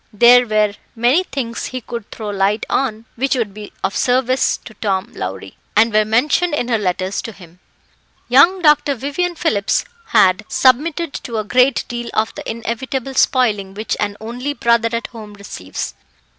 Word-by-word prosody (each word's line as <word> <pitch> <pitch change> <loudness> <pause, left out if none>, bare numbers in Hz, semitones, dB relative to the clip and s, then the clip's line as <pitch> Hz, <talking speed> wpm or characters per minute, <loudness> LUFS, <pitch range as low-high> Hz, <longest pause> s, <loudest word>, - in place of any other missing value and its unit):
There 240 +3 +6
were 215 -1 +2 0.2
many 245 +10 +3
things 245 -6 -4
he 255 - -4
could 235 -2 -7
throw 215 -2 -6
light 200 +2 0
on 230 -4 -1
which 270 +3 0
would 225 -6 -2
be 210 0 -9
of 195 - -1
service 255 +1 +1
to 225 - -10
Tom 195 -3 -1
Lowrie, 95 +1 -6 0.2
and 220 +1 +4
were 215 0 +4
mentioned 295 +9 +2
in 245 -4 -2
her 225 -2 +2
letters 185 0 -1
to 225 - -7
him. 180 -4 -16 0.7
Young 340 +9 +5
Dr. 295 -2 +4
Vivian 290 +8 -2
Phillips 220 - 0 0.2
had 210 -2 +4
submitted 300 +5 +2
to 230 -2 -5
a 215 - -1
great 250 +4 +2
deal 240 -1 -5
of 220 +1 +1
the - - -7
inevitable 240 +3 -4
spoiling 210 -8 +1
which 215 +2 -2
an 205 -1 -2
only 245 +6 -4
brother 235 -1 +2
at 230 0 -2
home 215 -3 -10
receives. 95 - -6
230 Hz, 170 wpm, -18 LUFS, 210-260 Hz, 0.7 s, There